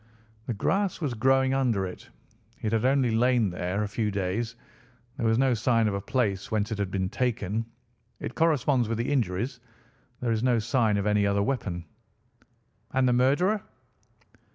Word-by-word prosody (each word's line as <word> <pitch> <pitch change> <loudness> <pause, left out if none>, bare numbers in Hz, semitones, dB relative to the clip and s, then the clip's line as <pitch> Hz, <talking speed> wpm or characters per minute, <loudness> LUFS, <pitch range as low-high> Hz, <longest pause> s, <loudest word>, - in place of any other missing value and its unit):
"The 120 - -2
grass 195 - 0
was 145 -7 -2
growing 130 +3 +3
under 120 -8 +1
it. 90 - -9 0.5
It 110 - 0
had 115 +1 +1
only 130 -2 +3
lain 120 -2 +2
there 90 +3 -2
a - - -2
few 105 +1 -1
days. 100 +4 -2 0.6
There 115 -4 0
was 110 0 +3
no 130 0 +3
sign 115 0 +2
of 105 - 0
a 100 - -2
place 100 -3 -1
whence 110 0 -1
it 105 - -3
had 100 -2 -1
been 95 -1 -1
taken. 115 -1 -1 0.5
It - - -5
corresponds 145 -7 +2
with 115 - -1
the 120 +4 -1
injuries. 115 0 -1 0.6
There 120 -2 -1
is 110 -1 0
no 125 -1 +3
sign 115 -1 +1
of 100 - -1
any 105 -1 +2
other 100 0 +2
weapon." 100 -9 -2 1.1
"And 130 -1 +3
the 125 - +3
murderer?" 145 - +2
115 Hz, 175 wpm, -27 LUFS, 100-130 Hz, 1.1 s, growing